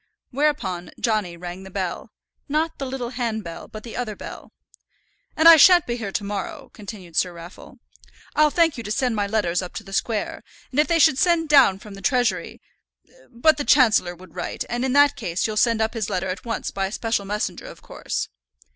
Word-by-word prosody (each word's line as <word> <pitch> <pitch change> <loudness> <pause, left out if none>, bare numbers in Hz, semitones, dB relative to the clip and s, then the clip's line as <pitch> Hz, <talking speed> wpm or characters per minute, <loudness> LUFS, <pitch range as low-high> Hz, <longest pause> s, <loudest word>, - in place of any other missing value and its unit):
Whereupon 245 - -1
Johnny 210 -7 -1
rang 175 +1 -7
the 190 - -10
bell 185 -2 -4 0.4
not 315 +3 -1
the 275 - -3
little 255 -2 -4
handbell, 220 -9 -4
but 215 0 -10
the 230 - -9
other 230 -4 -3
bell. - - -10 0.9
"And 320 +1 +6
I 335 -1 +11
shan't 350 +3 +7
be 240 - -2
here 215 -4 -5
to 205 - -2
morrow," 200 -2 -5
continued 195 -5 -10
Sir 180 - +2
Raffle. 170 +2 -12 0.6
"I'll 305 0 +5
thank 325 -4 +2
you - - -6
to 210 - -7
send 245 +1 0
my 205 -1 0
letters 200 -5 0
up 180 - -8
to - - -5
the 195 - -12
square; 215 +1 -2 0.3
and 270 - -1
if 300 - +4
they 335 - +2
should 275 -4 +4
send 335 -2 +2
down 270 -10 +6
from 205 +1 -12
the 195 - -10
Treasury; 250 -1 0 0.7
but 265 +6 +3
the 290 - -2
Chancellor 220 -11 +4
would 185 +2 -16
write, 175 - -4
and 240 +1 -2
in 260 -1 0
that 285 0 +5
case 180 -5 -2
you'll 215 - -2
send 230 0 +2
up 220 - -2
his 225 -4 -3
letter 185 +1 -2
at 185 0 -5
once 230 - -3
by 195 -1 -2
a - - -8
special 225 -2 -1
messenger, 210 +2 -3
of - - -12
course." - - -4
220 Hz, 210 wpm, -23 LUFS, 190-265 Hz, 0.9 s, I